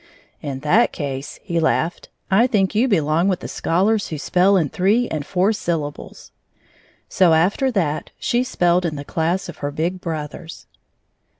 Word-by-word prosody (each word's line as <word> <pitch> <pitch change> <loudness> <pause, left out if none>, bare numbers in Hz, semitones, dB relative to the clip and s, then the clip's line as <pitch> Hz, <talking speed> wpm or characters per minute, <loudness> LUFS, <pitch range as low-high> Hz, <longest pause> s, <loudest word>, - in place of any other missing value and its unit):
"In 135 -2 -5
that 180 +11 +3
case," 140 -2 -5
he 170 -4 -1
laughed, 160 +1 0 0.2
"I 225 +6 +5
think 200 -5 +1
you 225 +5 +2
belong 165 - +2
with 185 -3 0
the - - -5
scholars 200 +6 0
who 155 - -5
spell 185 +6 +3
in 160 -6 +1
three 210 - +2
and 155 -2 -3
four 190 +7 +1
syllables." 165 -8 -5 0.8
So 180 -3 +3
after 195 +11 +2
that, 170 - -1
she 240 +1 0
spelled 175 -7 +1
in 165 -3 -2
the 145 0 -7
class 170 +5 -1
of - - -9
her 145 - -3
big 170 +5 -3
brothers. 160 -1 -6
175 Hz, 165 wpm, -21 LUFS, 155-195 Hz, 0.8 s, I